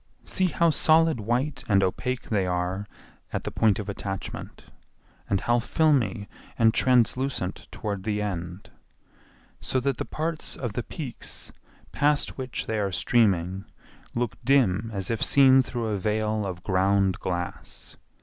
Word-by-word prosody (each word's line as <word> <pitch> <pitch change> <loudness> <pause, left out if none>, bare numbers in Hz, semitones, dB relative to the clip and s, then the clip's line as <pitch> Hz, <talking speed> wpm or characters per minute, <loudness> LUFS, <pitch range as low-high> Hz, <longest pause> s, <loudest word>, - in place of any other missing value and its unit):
See 185 -1 +2
how 170 0 +2
solid 160 -2 +4
white 125 +7 -1
and 100 -1 +4
opaque 125 +7 -2
they 100 -4 +1
are 90 +3 -2 0.4
at - - -3
the - - -4
point 110 -3 +3
of 105 - -5
attachment 95 -1 -6 0.6
and 100 -2 +1
how 120 0 +2
filmy 120 -7 +1 0.3
and 110 -1 +4
translucent 125 -5 +1
toward 100 -3 -4
the 105 +1 -1
end, 90 -3 -5 0.9
so 130 - 0
that 135 -1 -1
the - - -3
parts 160 0 -2
of 120 -5 -4
the 120 - -2
peaks 130 0 -7 0.4
past 145 0 +1
which 130 -2 -4
they 110 -1 -2
are 100 -2 -1
streaming 95 -2 +2 0.5
look 120 -1 -2
dim 115 -6 +3
as 100 -1 -3
if 115 - -2
seen 135 -1 +6
through 120 -2 -4
a 105 -2 -1
veil 105 +1 0
of 90 -1 -6
ground 95 0 +2
glass. 90 -1 -5
110 Hz, 145 wpm, -26 LUFS, 95-130 Hz, 0.9 s, seen